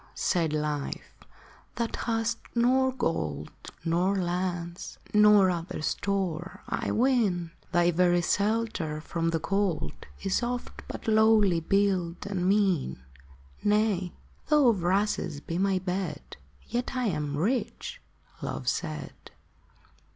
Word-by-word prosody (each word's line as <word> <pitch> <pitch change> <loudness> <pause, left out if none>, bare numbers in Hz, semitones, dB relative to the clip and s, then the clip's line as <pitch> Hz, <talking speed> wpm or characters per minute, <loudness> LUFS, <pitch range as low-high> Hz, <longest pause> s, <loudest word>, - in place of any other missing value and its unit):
said 165 -4 +1
Life, 150 -2 -3 0.3
" - - -26
that 235 -1 -2
hast 230 0 -1 0.2
nor 260 +2 +3
gold, 75 - -2 0.3
Nor 175 +4 +2
lands, 175 -1 -3 0.2
nor 210 -3 +6
other 170 -2 -4
store, 190 -2 -2
I - - -2
ween; 215 -9 +2 0.2
Thy 175 -1 +4
very 175 0 +3
shelter 205 -6 0
from 165 +1 -2
the 165 -1 0
cold 175 - 0 0.3
Is 195 - +1
oft 245 0 -4
but - - -7
lowly 215 -5 +5
built 185 -1 +1
and 190 -2 0
mean." 185 - +1 0.3
" 65 0 -25
Nay: 205 -4 +1 0.3
though 300 -5 +5
of 205 -6 +1
rushes 185 -4 0
be 165 +4 -4
my 195 0 +2
bed, 180 -4 -4 0.3
Yet 245 +2 -2
am 155 - -1
I - - -2
rich," 220 +5 -2 0.4
Love - - -4
said. - - -2
185 Hz, 120 wpm, -28 LUFS, 165-210 Hz, 0.4 s, nor